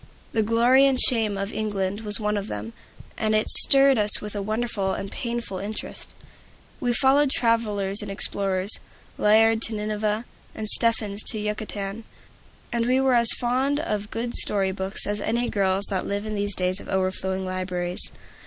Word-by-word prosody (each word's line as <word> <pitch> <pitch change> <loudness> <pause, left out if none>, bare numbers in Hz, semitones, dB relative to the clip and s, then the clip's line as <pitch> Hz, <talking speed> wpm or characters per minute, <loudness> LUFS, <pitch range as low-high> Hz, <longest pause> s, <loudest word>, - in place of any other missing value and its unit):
"The 225 - 0
Glory 240 +5 +3
and 265 -2 +1
Shame 220 -5 +4
of 195 +1 -4
England" 205 -1 -3
was 210 -1 +2
one 210 -1 -1
of 205 -1 -4
them, 105 +2 -7 0.5
and 215 -1 0
it 215 - +1
stirred 275 -3 +7
us 210 0 +6
with 210 0 -8
a 205 - -3
wonderful 215 -2 -2
and 195 - -7
painful 235 -5 -4
interest. 210 +3 -7 0.6
We 245 - -1
followed 270 +3 +3
travelers 215 -5 -1
and 205 - -7
explorers, 195 -1 +1 0.5
Layard 220 +1 +4
to 225 -1 -3
Nineveh, 210 +1 -2 0.3
and 215 - -5
Stephens 215 -2 +1
to 225 - -2
Yucatan. 210 0 -5 0.7
And 235 0 -1
we 255 +1 +2
were 265 -1 +2
as 235 -1 +5
fond 260 +4 0
of 210 -9 -3
good 235 +1 -4
story 195 -2 0
books 190 +1 -5
as 205 0 -3
any 235 +3 -1
girls 195 -1 0
that 190 -2 -2
live 200 +1 -3
in 215 - -5
these 205 -1 -2
days 185 +1 -1
of - - -12
overflowing 190 0 -2
libraries. 180 -1 0
210 Hz, 170 wpm, -23 LUFS, 195-230 Hz, 0.7 s, stirred